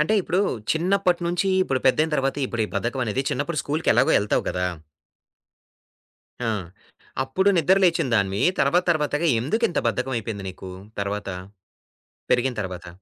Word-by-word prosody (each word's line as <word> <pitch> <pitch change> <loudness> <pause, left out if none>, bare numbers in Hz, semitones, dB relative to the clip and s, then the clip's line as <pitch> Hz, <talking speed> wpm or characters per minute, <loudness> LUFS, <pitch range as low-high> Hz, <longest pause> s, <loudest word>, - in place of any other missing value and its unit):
అంటే 160 +8 +2
ఇప్పుడు, 180 +2 0 0.3
చిన్నప్పటి 180 +2 +1
నుంచి 175 +3 0
ఇప్పుడు 135 -7 -1
పెద్దయిన 155 +5 +3
తర్వాత 135 0 0
ఇప్పుడు, 120 -2 -2
ఈ - - -15
బద్ధకం 120 +6 -1
అనేది 130 +6 -1
చిన్నప్పుడు 145 +3 -1
స్కూలూకి 155 +3 0
ఎలాగో - - +4
ఎళ్తావు 105 - 0
కదా! 90 0 -1 1.8
ఆ! - - 0 0.8
అప్పుడు 190 +10 +1
నిద్ర 175 +4 +4
లేచిందానివి 115 - +2 0.2
తర్వాత, 165 +6 +3
తర్వాతగా 150 +1 0
ఎందుకు 220 - -1
ఇంత 175 - -1
బద్ధకమయిపోయింది 115 -3 -2
నీకు 95 0 -9 0.3
తర్వాత? 100 0 -3 1.0
పెరిగిన 125 +1 +2
తరవాత? 90 -2 -6
135 Hz, 135 wpm, -24 LUFS, 110-170 Hz, 1.8 s, ఎలాగో